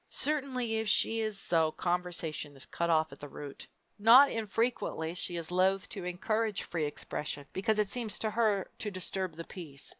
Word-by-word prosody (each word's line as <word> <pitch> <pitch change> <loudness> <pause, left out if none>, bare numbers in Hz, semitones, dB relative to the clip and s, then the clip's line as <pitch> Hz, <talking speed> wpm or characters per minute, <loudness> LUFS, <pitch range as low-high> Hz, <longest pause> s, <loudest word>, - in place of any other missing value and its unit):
Certainly 260 -6 -1
if 220 0 -1
she 225 +2 +3
is 215 -2 -1
so, 160 -4 +2
conversation 175 -4 -2
is 135 - -4
cut 170 0 -2
off 160 -1 +3
at - - -12
the 145 - -8
root. 140 +1 -8 0.3
Not 240 +7 +8
infrequently 225 -7 -1
she 175 0 -1
is 165 0 -4
loath 190 +1 +2
to 190 -3 -5
encourage 215 +4 -1
free 160 -3 -2
expression 145 0 -4
because 210 +3 +1
it 210 -2 +1
seems 235 -4 +1
to 220 - -1
her 210 -3 +1
to 210 - -2
disturb 185 -2 -3
the 165 - -6
peace. 155 -6 -6
190 Hz, 180 wpm, -31 LUFS, 165-220 Hz, 0.3 s, Not